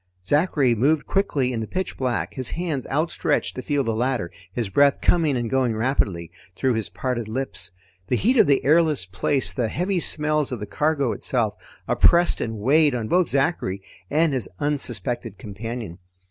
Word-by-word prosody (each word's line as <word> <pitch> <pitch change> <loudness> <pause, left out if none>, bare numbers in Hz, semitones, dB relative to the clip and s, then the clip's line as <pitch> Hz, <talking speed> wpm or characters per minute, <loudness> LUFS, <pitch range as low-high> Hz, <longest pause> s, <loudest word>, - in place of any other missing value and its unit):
Zachary 145 - +2
moved 145 +7 +2
quickly 140 -10 0
in 115 - -2
the 110 - -4
pitch 185 0 -3
black, 130 -2 -2
his 130 -2 +1
hands 160 -6 -3
outstretched 155 0 0
to 130 - -5
feel 145 +2 0
the 115 -2 -1
ladder, 120 -6 -1 0.2
his 115 +2 -2
breath 140 +8 +3
coming 160 -6 +2
and 120 -1 -2
going 125 -2 +1
rapidly 105 - -1 0.2
through 130 -2 +1
his 110 -2 -2
parted 120 -4 -3
lips. 110 -5 -3 0.4
The 125 - +1
heat 245 - +2
of 220 - +6
the 140 -1 +2
airless 155 - +3
place, 95 +9 -1
the 120 -3 0
heavy 180 - -1
smells 150 -3 +1
of 125 - -4
the 105 - -4
cargo 140 +2 0
itself, 115 -5 0 0.3
oppressed 175 0 +3
and 115 -1 -3
weighed 145 +5 +3
on 110 -3 -3
both 180 -1 +2
Zachary 135 - 0 0.3
and 155 0 +2
his 125 -7 -2
unsuspected 120 -6 -2
companion. 105 -2 -7
130 Hz, 175 wpm, -23 LUFS, 115-150 Hz, 0.4 s, of